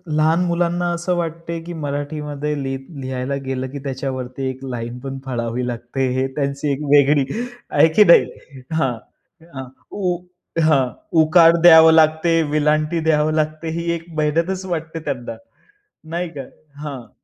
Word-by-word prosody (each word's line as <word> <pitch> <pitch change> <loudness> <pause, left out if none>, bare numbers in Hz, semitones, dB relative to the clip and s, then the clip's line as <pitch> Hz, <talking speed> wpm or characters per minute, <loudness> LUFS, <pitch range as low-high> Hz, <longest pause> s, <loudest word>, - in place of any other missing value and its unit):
लहान 160 +2 +3
मुलांना 175 0 0
असं 175 +1 -1
वाटते, 165 0 -4
की 175 +1 -7
मराठीमध्ये 150 0 -4
लि 135 0 -2 0.3
लिहायला 130 +1 -3
गेलं, 130 0 -3
की 140 - -7
त्याच्यावरती 130 -1 -4
एक 130 +1 -8
लाईन 120 -1 -5
पण 135 +1 -6
फाळावी 120 -1 -3
लागते. 120 +2 -3
हे 130 - +1
त्यांची 140 0 -1
एक 140 - -2
वेगळी 145 -1 +5 0.4
आहे 145 +2 +5
की 210 - +7
नाही? - - +7 0.5
हां, 135 -6 +1 0.6
अ, 135 -1 -6 0.3
उ 180 -3 -1 0.5
हां, 140 -5 +3 0.3
उकार 165 +1 +6
द्यावं 160 -1 +8
लागते, 160 +1 +3
वेलांटी 155 +2 +1
द्यावी 155 0 +2
लागते. 155 +1 -2
ही 170 0 -1
एक 165 -1 -6
मेहनतच 165 +5 0
वाटते 165 -2 -4
त्यांना, 120 -5 -4 0.8
नाही 175 0 -2
का? - - -3 0.4
हां. 135 -5 -7
150 Hz, 145 wpm, -20 LUFS, 135-165 Hz, 0.8 s, द्यावं